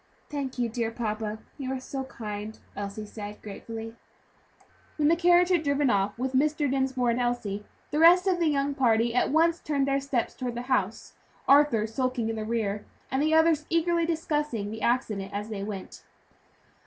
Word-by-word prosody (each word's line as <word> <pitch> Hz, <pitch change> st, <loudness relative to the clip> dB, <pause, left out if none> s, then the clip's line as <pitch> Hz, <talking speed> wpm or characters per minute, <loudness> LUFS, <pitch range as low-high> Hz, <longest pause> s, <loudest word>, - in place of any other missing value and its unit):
"Thank 275 Hz, -3 st, -4 dB
you, 240 Hz, -1 st, +1 dB
dear 230 Hz, 0 st, -2 dB
papa, 215 Hz, -2 st, -3 dB, 0.2 s
you 265 Hz, -1 st, -3 dB
are 265 Hz, -, -2 dB
so 265 Hz, +1 st, -5 dB
kind," 215 Hz, -3 st, -6 dB, 0.2 s
Elsie 205 Hz, +1 st, -5 dB
said, 210 Hz, 0 st, -8 dB
gratefully. 225 Hz, +2 st, -7 dB, 1.0 s
When 300 Hz, -1 st, +3 dB
the 335 Hz, -, +5 dB
carriage 350 Hz, +1 st, +4 dB
had 355 Hz, -3 st, +3 dB
driven 285 Hz, -3 st, +2 dB
off 200 Hz, +1 st, 0 dB
with 260 Hz, +2 st, -2 dB
Mr. 295 Hz, +2 st, +2 dB
Dinsmore 265 Hz, -2 st, +1 dB
and 235 Hz, -, -1 dB
Elsie, 215 Hz, -4 st, -2 dB, 0.3 s
the 300 Hz, -, 0 dB
rest 350 Hz, +3 st, +7 dB
of 370 Hz, -2 st, +2 dB
the 335 Hz, -, +2 dB
young 285 Hz, -1 st, +1 dB
party 235 Hz, -3 st, +2 dB
at 250 Hz, -, +2 dB
once 330 Hz, +3 st, +3 dB
turned 280 Hz, -2 st, 0 dB
their 275 Hz, 0 st, +1 dB
steps 270 Hz, -4 st, -1 dB
toward 245 Hz, -2 st, -4 dB
the 240 Hz, -, -4 dB
house; 205 Hz, -3 st, -1 dB, 0.3 s
Arthur 275 Hz, -6 st, +5 dB
skulking 245 Hz, 0 st, -1 dB
in 225 Hz, -, -2 dB
the 215 Hz, -1 st, -4 dB
rear, 215 Hz, -2 st, -1 dB, 0.3 s
and 265 Hz, -, +1 dB
the 310 Hz, +1 st, +3 dB
others 320 Hz, -1 st, +4 dB
eagerly 335 Hz, 0 st, +2 dB
discussing 295 Hz, -10 st, -1 dB
the 220 Hz, 0 st, -6 dB
accident 210 Hz, -5 st, 0 dB
as 210 Hz, +2 st, -3 dB
they 210 Hz, -3 st, -4 dB
went. 200 Hz, -2 st, -7 dB
255 Hz, 180 wpm, -27 LUFS, 220-295 Hz, 1.0 s, rest